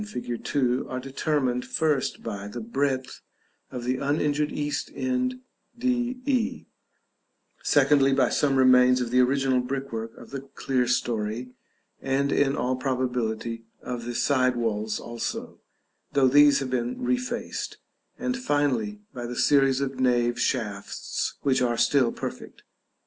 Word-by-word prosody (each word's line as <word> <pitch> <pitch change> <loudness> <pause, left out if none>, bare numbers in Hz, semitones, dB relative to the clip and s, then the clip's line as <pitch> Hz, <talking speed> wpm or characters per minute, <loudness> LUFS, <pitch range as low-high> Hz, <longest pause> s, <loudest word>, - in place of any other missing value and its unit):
fig. 125 - -5
2, 130 -2 0
are 130 - -3
determined, 130 -1 -1
first, 150 -4 0
by 100 -3 -5
the 105 +4 -6
breadth 130 +3 -2 0.5
of 125 -1 -6
the 125 +1 0
uninjured 145 +1 0
east 145 0 -2
end 255 0 -1 0.4
D 250 0 0
E; 255 -5 0 1.0
secondly, 140 -2 +4
by 135 -2 +3
some 140 -2 +2
remains 125 -1 +6
of 120 -2 -2
the 125 - +4
original 130 0 +3
brickwork 125 -3 -4
of - - -13
the 135 - -4
clerestory, 125 -3 -1 0.5
and 140 +1 0
in 140 -1 +2
all 130 +1 0
probability 125 -3 -2 0.2
of 120 -2 -5
the 120 0 -4
side 130 -2 +2
walls 110 -2 -1
also, 115 0 -5 0.5
though 140 -2 +5
these 145 +1 +6
have 130 -1 -4
been 120 -1 -1
refaced; 250 -1 -3 0.4
and 255 - -1
finally 130 - 0
by 120 -1 -5
the 120 - -5
series 135 0 +3
of 135 -1 -3
nave 120 -2 +2
shafts, 105 -6 -2
which 135 -2 +2
are 120 -2 +1
still 130 -3 +3
perfect. - - -7
130 Hz, 135 wpm, -26 LUFS, 120-145 Hz, 1.0 s, remains